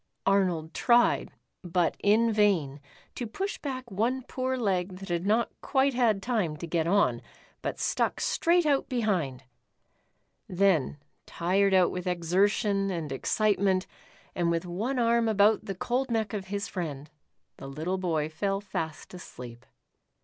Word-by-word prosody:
Arnold 180 Hz, -5 st, +1 dB
tried, 240 Hz, -1 st, +3 dB, 0.3 s
but 175 Hz, -1 st, 0 dB
in 220 Hz, +3 st, +3 dB
vain, 175 Hz, -10 st, +1 dB, 0.3 s
to 240 Hz, -, -5 dB
push 390 Hz, -, -4 dB
back 260 Hz, -4 st, -5 dB
one 240 Hz, +7 st, 0 dB
poor 260 Hz, +1 st, -2 dB
leg 190 Hz, -5 st, -1 dB
that 195 Hz, 0 st, -9 dB
had 175 Hz, +2 st, -1 dB
not 225 Hz, +3 st, +2 dB
quite 275 Hz, 0 st, +2 dB
had 225 Hz, -5 st, +2 dB
time 210 Hz, -11 st, -1 dB
to 170 Hz, -, -6 dB
get 165 Hz, -1 st, -1 dB
on, 200 Hz, +3 st, +2 dB, 0.4 s
but -, -, -3 dB
stuck -, -, 0 dB
straight 345 Hz, 0 st, +2 dB
out 285 Hz, -2 st, +1 dB
behind. 185 Hz, -, -1 dB, 1.1 s
Then, 180 Hz, -7 st, +2 dB, 0.3 s
tired 190 Hz, +3 st, +1 dB
out 185 Hz, -2 st, +4 dB
with 180 Hz, -1 st, -5 dB
exer 180 Hz, +3 st, +2 dB
tion 200 Hz, -2 st, 0 dB
and 165 Hz, -6 st, -4 dB
excitement, 195 Hz, +5 st, +1 dB, 0.5 s
and 175 Hz, -1 st, 0 dB
with 170 Hz, +1 st, -1 dB
one 215 Hz, +10 st, -2 dB
arm 235 Hz, -1 st, +2 dB
about 210 Hz, 0 st, +3 dB
the 195 Hz, -, -4 dB
cold 250 Hz, +7 st, -1 dB
neck 220 Hz, -3 st, -1 dB
of 200 Hz, -3 st, -4 dB
his 200 Hz, +1 st, -3 dB
friend, 150 Hz, -6 st, -5 dB, 0.5 s
the -, -, -9 dB
little 160 Hz, +7 st, -3 dB
boy 160 Hz, -5 st, 0 dB
fell 195 Hz, +5 st, -2 dB
fast 165 Hz, -6 st, -5 dB
asleep. 125 Hz, -8 st, -10 dB
195 Hz, 150 wpm, -28 LUFS, 170-225 Hz, 1.1 s, out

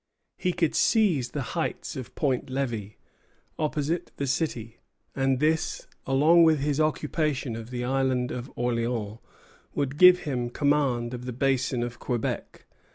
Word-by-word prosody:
He 180 Hz, -, 0 dB
could 165 Hz, -3 st, 0 dB
seize 175 Hz, -, +3 dB
the 140 Hz, +1 st, -3 dB
heights -, -, -3 dB
of 130 Hz, -3 st, -8 dB
Point 135 Hz, -3 st, 0 dB
Levi, 120 Hz, -6 st, -3 dB, 0.6 s
opposite 155 Hz, +3 st, -1 dB
the 140 Hz, -, -1 dB
city; 125 Hz, -5 st, -2 dB, 0.4 s
and 135 Hz, -1 st, +1 dB
this, 160 Hz, +2 st, 0 dB, 0.2 s
along 150 Hz, +6 st, +5 dB
with 160 Hz, -1 st, +5 dB
his 145 Hz, +1 st, 0 dB
occupation 150 Hz, -4 st, -1 dB
of 115 Hz, 0 st, -7 dB
the 125 Hz, -1 st, -4 dB
Island 130 Hz, -1 st, 0 dB
of 125 Hz, +2 st, -6 dB
Orleans, 115 Hz, -3 st, -2 dB, 0.6 s
would 140 Hz, +1 st, -2 dB
give 180 Hz, 0 st, +8 dB
him 125 Hz, -4 st, -2 dB
command 130 Hz, -3 st, +1 dB
of 125 Hz, 0 st, -6 dB
the 125 Hz, -, -4 dB
Basin 130 Hz, -1 st, 0 dB
of 120 Hz, 0 st, -6 dB
Quebec. 120 Hz, -3 st, -3 dB
135 Hz, 145 wpm, -27 LUFS, 120-150 Hz, 0.6 s, give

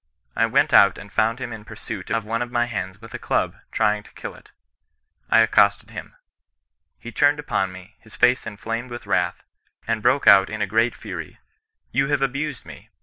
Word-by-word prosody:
I -, -, +2 dB
went -, -, +2 dB
out 100 Hz, -, +6 dB
and 100 Hz, -, -11 dB
found 115 Hz, +2 st, +1 dB
him 125 Hz, -2 st, -6 dB
in 110 Hz, -1 st, -9 dB
pursuit 110 Hz, -2 st, -8 dB
of 115 Hz, -2 st, -1 dB
one 115 Hz, +2 st, -2 dB
of 120 Hz, -, -3 dB
my 120 Hz, 0 st, +1 dB
hens 95 Hz, -4 st, -5 dB
with 115 Hz, 0 st, -13 dB
a -, -, -5 dB
club, -, -, -1 dB, 0.2 s
trying 105 Hz, 0 st, +1 dB
to -, -, -19 dB
kill -, -, -7 dB
it. -, -, -18 dB, 0.8 s
I 115 Hz, -, +6 dB
accosted 100 Hz, -2 st, +3 dB
him. -, -, -9 dB, 0.8 s
He 120 Hz, -, -10 dB
turned 145 Hz, +4 st, +3 dB
upon 95 Hz, -10 st, -1 dB
me, 95 Hz, +3 st, -13 dB
his 110 Hz, -, -14 dB
face 125 Hz, -1 st, +3 dB
inflamed 115 Hz, +3 st, -5 dB
with 120 Hz, 0 st, -8 dB
wrath, 90 Hz, -1 st, -1 dB, 0.4 s
and 115 Hz, -1 st, -1 dB
broke 135 Hz, +6 st, +2 dB
out 95 Hz, -1 st, +7 dB
in 110 Hz, -, -5 dB
a 105 Hz, -, +1 dB
great 115 Hz, +4 st, +1 dB
fury 90 Hz, -7 st, -8 dB, 0.2 s
— -, -, -53 dB
* -, -, -48 dB
You 135 Hz, +2 st, +1 dB
have 145 Hz, -1 st, +1 dB
abused 140 Hz, +1 st, -3 dB
me. -, -, -13 dB
115 Hz, 205 wpm, -23 LUFS, 100-120 Hz, 0.8 s, out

